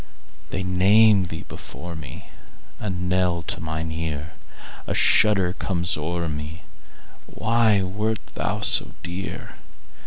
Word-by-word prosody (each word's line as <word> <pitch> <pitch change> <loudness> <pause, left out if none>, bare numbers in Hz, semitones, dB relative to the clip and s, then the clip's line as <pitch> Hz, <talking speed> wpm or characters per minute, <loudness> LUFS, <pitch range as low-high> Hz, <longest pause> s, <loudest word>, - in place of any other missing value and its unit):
They 95 - -2
name 100 +2 +5
thee 80 -1 -6
before 85 0 -8
me,A 80 +7 -10
knell 90 -1 0
to - - -4
mine 80 0 -3
ear;A 80 -1 -6
shudder 95 -4 +4
comes 90 -3 -1
o'er 85 +2 -2
me—Why 95 +7 -2
wert 105 +4 -1 0.2
thou - - -2
so - - +3
dear? 90 +2 -6
90 Hz, 100 wpm, -24 LUFS, 80-95 Hz, 0.2 s, name